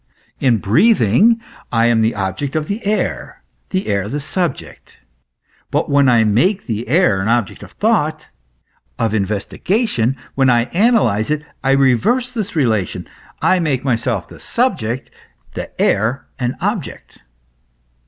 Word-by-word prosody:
In 125 -4 +3
breathing 195 - +3 0.3
I 115 -1 +2
am 120 -1 +3
the 110 +1 +1
object 100 +9 -3
of 155 -1 -1
the 205 +3 -4
air, 215 +1 -2 0.3
the 190 0 -2
air 100 -1 -1
the 145 +7 -3
subject; 165 +1 -4 0.7
but - - -1
when 140 -2 +4
I 120 -2 +4
make 175 - +1
the 115 0 -4
air 140 - +3
an 95 - -2
object 115 -3 0
of - - -12
thought, 155 -9 0 0.7
of 115 -2 0
investigation, 115 - -1 0.2
when 135 -1 +3
I 120 -1 +4
analyze 175 - +2
it, 150 0 -1 0.2
I 135 0 +3
reverse 140 - +2
this 215 -7 -4
relation, 110 - 0 0.4
I 185 - +3
make 145 -7 -1
myself 120 -7 -1
the - - -14
subject, 130 - -1 0.4
the - - -7
air 115 +7 +1
an 125 -1 -1
object. - - -4
130 Hz, 140 wpm, -18 LUFS, 110-185 Hz, 0.7 s, when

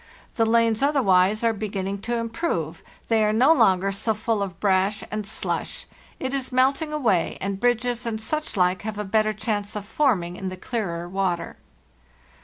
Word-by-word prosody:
The 225 -1 +2
lanes 230 0 +3
otherwise 215 -8 +3
are 230 -1 +3
be 215 0 -4
ginning 195 0 -3
to 240 +3 -2
improve; 225 - -2 0.3
they 225 -1 +3
are 210 - +3
no 255 +9 +5
longer 195 - +3
so 215 +3 0
full 220 0 -1
of 185 -4 -4
brash 195 0 +1
and 215 -1 -3
slush; 205 - -3 0.3
it 265 0 -3
is 270 -1 -2
melting 270 +5 +2
away, 240 - +1
and 195 0 -3
bridges 245 +1 +1
and 220 -1 -2
such 305 +2 -3
like 180 0 +2
have 215 -1 -5
a 210 - -2
better 215 +2 +2
chance 210 -1 -3
of 205 -1 -4
forming 200 -8 0
in 190 - -4
the 185 - -7
clearer 180 -6 -3
water. 180 -2 -2
215 Hz, 180 wpm, -24 LUFS, 195-235 Hz, 0.3 s, no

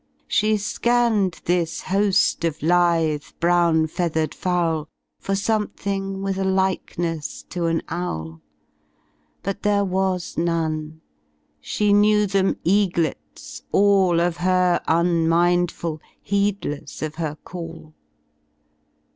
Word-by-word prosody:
She 215 0 +2
scanned 215 -3 +1
this 170 -2 0
ho 200 +2 +1
ft 190 - +2
of 155 -2 -5
lithe, 165 -3 +2 0.2
brown 170 -2 +3
feathered 160 -1 -1
fowl 165 -4 -1 0.3
For 195 - -2
something 200 -2 -2
tvith 195 0 -3
a - - 0
likeness 185 -4 -1
to 175 -2 -1
an 165 0 0
owl; 80 - -5 1.0
But 195 0 -3
there 205 -1 +2
zuas 185 -2 -1
none; 160 -2 -2 0.6
she 205 - 0
kneiv 210 -1 +4
them 195 -1 +2
eaglets 170 - -1
all 195 -4 +4
Of 170 0 0
her 180 -1 +2
unmindful, 170 -1 +1 0.2
heedless 200 -9 -2
of 155 -1 -3
her 155 -2 -3
call. 165 -3 -9
175 Hz, 105 wpm, -22 LUFS, 165-195 Hz, 1.0 s, kneiv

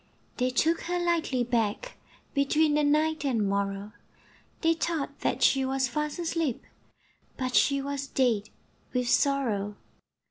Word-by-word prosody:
They 250 0 +1
took 320 +6 +1
her 355 +1 -1
lightly 335 -7 +1
back, 235 - -1 0.4
Between 295 +2 +2
the 300 0 +2
night 305 +1 +2
and 230 -7 +1
morrow, 200 +1 -2 0.7
They 330 -1 +4
thought 325 -3 -3
that - - -1
she 270 -1 +4
was 265 0 0
fast 300 +4 -3
asleep, 330 -6 -1 0.7
But 255 -1 -2
she 275 +1 +3
was 280 0 -3
dead 230 -7 +1 0.4
with 250 -1 0
sorrow. 235 -8 +1
275 Hz, 135 wpm, -28 LUFS, 240-310 Hz, 0.7 s, They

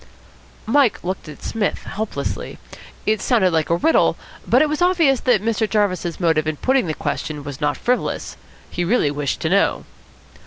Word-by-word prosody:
Mike 255 +1 +2
looked 185 -2 -4
at 150 - -12
Psmith 215 -3 -2
helplessly. 200 -8 -4 0.5
It 215 0 +1
sounded 215 -8 +3
like 160 -1 +1
a 170 - +3
riddle, 320 - +3 0.3
but 255 +5 +5
it - - +2
was 305 +2 -3
obvious 335 -8 +3
that 235 -5 +2
Mr. 220 -1 0
Jarvis's 185 -5 0
motive 160 -3 +1
in 155 - -1
putting 260 - +1
the 155 - -2
question 150 -2 -4
was 140 -2 -8
not 145 0 0
frivolous. 250 +1 -1 0.4
He 175 - -2
really 175 -6 +2
wished 145 -2 -3
to - - 0
know. - - +2
200 Hz, 170 wpm, -21 LUFS, 160-250 Hz, 0.5 s, but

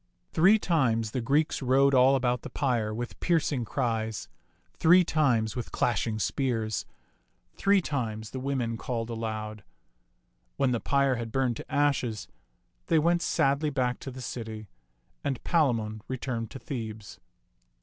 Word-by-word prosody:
Three 190 +7 +6
times 120 - +1
the 130 - -2
Greeks 145 +7 +1
rode 135 +2 +4
all 130 +1 +6
about 125 -2 0
the - - -7
pyre 120 -6 0
with 120 +3 -5
piercing 150 -7 +1
cries; 110 -3 -2 0.4
three 180 +3 +6
times 125 -10 +1
with 120 -3 -5
clash 120 -1 0
ing 110 -1 -2
spears; 110 0 -1 0.7
three 200 -1 +3
times 110 -9 -3
the 130 - -5
women 130 -4 -2
called 115 0 -3
aloud. 110 -2 -4 0.9
When 135 -2 +2
the 120 - 0
pyre 140 -1 +2
had 115 -1 -5
burned 130 -3 0
to - - -10
ashes, 130 -6 0 0.6
they 165 - +3
went 170 +2 +3
sadly 140 -1 +1
back 125 -3 -1
to - - -7
the 130 0 -8
city, 110 -3 -6 0.6
and 135 -3 -2
Palamon 115 - +1
returned 120 -3 -3
to - - -8
Thebes. 110 -6 -7
125 Hz, 145 wpm, -28 LUFS, 115-140 Hz, 0.9 s, Three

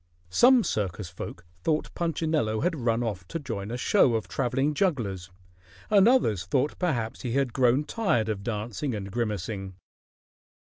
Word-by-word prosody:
Some 245 - +6
circus 100 - -2
folk 85 +1 -8 0.2
thought 155 -1 0
Punchinello 155 -9 0
had 175 -1 +1
run 115 +1 +2
off 100 -6 -4
to - - -4
join 115 -9 -5
a 120 - -3
show 125 - +3
of 110 - -2
traveling 135 +3 0
jugglers, 115 - -1 0.6
and 200 0 +6
others 110 - +2
thought 130 +8 0
perhaps 120 -11 -1
he 120 -2 -3
had 135 -3 +1
grown 130 +2 +3
tired 150 - 0
of 105 -3 -2
dancing 115 +4 -3
and 100 -1 -6
grimacing. 105 -3 -3
120 Hz, 150 wpm, -27 LUFS, 105-150 Hz, 0.6 s, Some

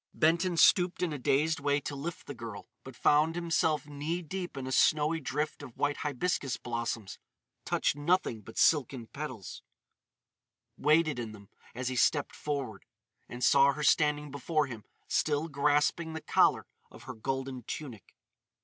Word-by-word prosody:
Benton 170 +2 +2
stooped 180 +1 +4
in 165 -4 0
a 145 - -5
dazed 150 +5 +1
way 145 0 +1
to 145 - -5
lift 165 +6 -6
the 145 - -6
girl; 115 -5 -8 0.2
but 130 -2 -10
found 155 +5 +3
himself 160 -4 +1
knee 150 +4 -4
deep 180 -1 -5
in 135 - -4
a 130 - -4
snowy 155 +4 +3
drift 150 +2 -3
of 130 -5 -11
white 145 0 0
hibiscus 145 -2 -1
blossoms—touched 115 +1 -4
nothing 145 -6 0
but 110 +2 -13
silken 135 -5 +2
petals—waded 150 - -4
in 115 -2 -5
them 100 -2 -14 0.3
as 125 +1 -2
he 130 - -3
stepped 145 +3 +2
forward. 140 -9 -4 0.5
And 125 +1 -6
saw 140 0 +5
her 150 +2 -5
standing 150 0 +2
before 150 +2 0
him 115 -6 -9 0.2
still 150 +1 0
grasping 150 +2 +1
the 160 - -5
collar - - +3 0.2
of - - -14
her 130 +1 -7
golden 130 +2 -4
tunic. 125 - -7
145 Hz, 150 wpm, -30 LUFS, 130-155 Hz, 0.5 s, saw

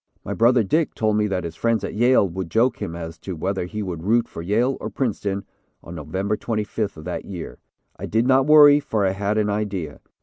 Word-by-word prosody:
My - - -3
brother, 120 +1 +4
Dick, 155 - 0
told 110 -1 +1
me 105 0 +2
that 95 -2 -2
his 85 -1 -6
friends 115 +4 0
at - - -4
Yale 120 -2 +4
would 90 -1 -5
joke 120 +6 +1
him 85 - -4
as 80 -1 -7
to 95 - -6
whether 95 +3 -2
he 105 +4 -5
would 90 -4 -5
root 115 +5 +2
for - - -8
Yale 115 +9 +1
or - - -4
Princeton 100 -6 -2 0.4
on 85 - -9
November 95 +7 -2
25th 105 -3 -3
of 80 - -9
that - - -4
year. 90 -4 -8 0.4
I - - -6
did 115 +2 +1
not 130 +1 +3
worry, 145 -1 +8
for 110 -8 -1
I 95 - +2
had 100 +2 -1
an 105 -1 +1
idea. 100 -7 -3
105 Hz, 225 wpm, -22 LUFS, 95-115 Hz, 0.4 s, worry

